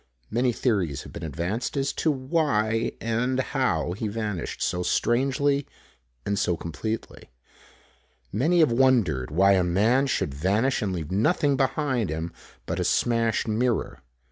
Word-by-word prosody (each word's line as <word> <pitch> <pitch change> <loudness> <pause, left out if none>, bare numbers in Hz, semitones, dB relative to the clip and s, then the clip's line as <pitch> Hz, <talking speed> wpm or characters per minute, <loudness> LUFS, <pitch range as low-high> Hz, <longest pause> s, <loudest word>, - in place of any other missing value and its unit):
Many 125 +2 +2
theories 100 - -1
have - - -12
been - - -7
advanced 85 - -3
as 135 0 0
to 160 - 0
why 130 -6 0
and 120 +3 0
how 130 - 0
he 105 +4 -3
vanished 105 -5 -4
so 90 - -1
strangely 135 +7 +1 0.6
and 100 0 0
so 90 -2 +1
completely. 110 - -5 1.0
Many 160 - +2
have 155 - +4
wondered 115 - +2
why 95 +6 +4
a 95 -2 +4
man 110 +10 +2
should 75 - -1
vanish 100 - +1
and 100 - -1
leave 85 -3 -4
nothing 140 - +2
behind 130 - 0
him 80 +2 -4 0.3
but - - -3
a - - +1
smashed 115 -2 +1
mirror. 110 - -1
115 Hz, 145 wpm, -25 LUFS, 90-130 Hz, 1.0 s, have